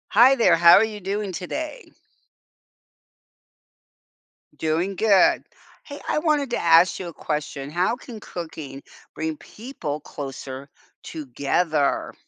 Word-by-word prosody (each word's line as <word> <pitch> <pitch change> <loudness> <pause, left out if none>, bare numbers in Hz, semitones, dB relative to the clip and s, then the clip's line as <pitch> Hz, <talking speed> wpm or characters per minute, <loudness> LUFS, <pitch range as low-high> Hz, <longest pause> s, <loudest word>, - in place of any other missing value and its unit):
Hi 245 +6 +6
there, 235 -8 +4
how 170 0 +8
are 205 - +6
you 215 -1 -4
doing 200 +1 -3
today? 310 - -6 2.6
Doing 170 +5 -1
good. 205 -2 +4 0.4
Hey, 285 -1 -9
I - - +1
wanted 300 -4 +1
to 240 - -1
ask 165 +1 +4
you 185 - -5
a 170 - -8
question, 150 -2 -4
how 180 +8 0
can 240 -3 -11
cooking 160 -7 -8 0.3
bring 160 -1 -3
people 170 - -7
closer 135 -1 -8 0.3
together? 150 +2 -1
175 Hz, 115 wpm, -23 LUFS, 150-220 Hz, 2.6 s, how